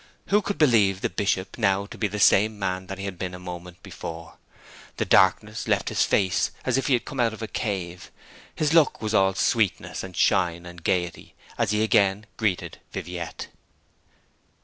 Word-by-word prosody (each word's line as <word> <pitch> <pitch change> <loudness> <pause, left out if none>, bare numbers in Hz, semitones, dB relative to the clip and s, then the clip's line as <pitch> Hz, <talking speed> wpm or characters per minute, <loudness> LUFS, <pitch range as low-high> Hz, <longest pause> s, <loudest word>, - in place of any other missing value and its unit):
Who 205 +2 +4
could 205 0 -3
believe 105 - +4
the - - -1
Bishop 95 +2 -1
now 100 -2 +2
to - - -11
be 105 - 0
the 105 +1 -5
same 105 +2 +4
man 95 -2 -3
that 95 - -6
he 100 - -5
had 95 -3 -6
been 90 -1 -4
a - - -9
moment 90 -1 -9
before? 80 0 -8 0.6
The - - 0
darkness - - +3
left - - +1
his - - +2
face 95 -3 +1 0.2
as 130 - +1
if 135 -1 0
he 140 - +3
had 120 - +1
come 135 - -7
out 115 -2 +2
of 110 - -8
a - - -3
cave; 95 -6 -4 0.5
his 155 0 0
look 165 -4 +4
was 110 0 -3
all 95 -2 +3
sweetness, 110 -1 0
and 95 -2 -9
shine, 85 -1 +2
and 85 -1 -11
gaiety, 90 -2 -2 0.2
as 115 -3 0
he 105 +1 +2
again 100 -1 +2
greeted 105 -5 -2
Viviette. 90 -1 -6
95 Hz, 190 wpm, -25 LUFS, 90-110 Hz, 0.6 s, Who